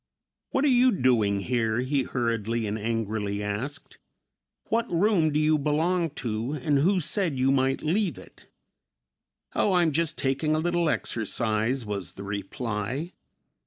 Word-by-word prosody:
"What 270 - +1
are - - +4
you 255 -1 +5
doing 115 - +2
here?" 115 0 0
he 135 +2 0
hurriedly 115 -2 -1
and 105 0 -2
angrily 105 -2 -2
asked. 115 +9 -5 0.7
"What 230 +1 0
room 175 -3 +3
do 150 - +1
you 155 0 +3
belong 165 +4 +1 0.2
to 115 +4 -2
and 145 0 +1
who 185 +6 +3
said 170 -3 0
you 130 +1 +3
might 135 0 +1
leave 170 - 0
it?" 95 - -15 1.1
"Oh, 200 - +2
I'm 175 -3 +3
just 160 +1 0
taking 140 +3 0
a - - +1
little 175 0 +1
exercise," 115 +1 -1
was 100 -4 -4
the 100 - -9
reply. 105 - -4
135 Hz, 145 wpm, -26 LUFS, 110-165 Hz, 1.1 s, you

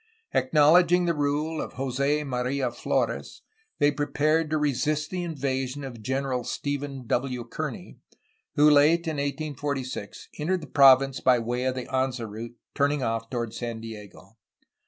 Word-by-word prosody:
Ac 130 - +1
knowledging 175 +4 +5
the 170 - +2
rule 150 +2 -1
of - - -6
Jos6 140 +3 0
Maria 125 0 -1
Flores 120 - -2 0.3
they 145 -1 +4
prepared 150 +2 +1
to 155 - +1
resist 150 +1 0
the 185 -1 -2
invasion 140 -4 -3
of 120 -4 -8
General 130 +1 -1
Stephen 140 0 -4
W. 125 +1 -1
Kearny, 115 - -6 0.6
who, 150 +1 +6
late 150 +4 +5
in 155 -2 -2
1846, 140 -5 -4
entered 175 +4 0
the - - -7
province 135 -1 +5
by 130 -1 +4
way 120 +2 -2
of 130 0 0
the 125 - -4
Anza 130 -3 -1
route, 115 +3 -8 0.2
turning 145 -1 +1
off 115 -1 -2
toward 120 -3 -3
San 115 -1 -4
Diego. 110 -2 -11
135 Hz, 150 wpm, -26 LUFS, 125-150 Hz, 0.6 s, who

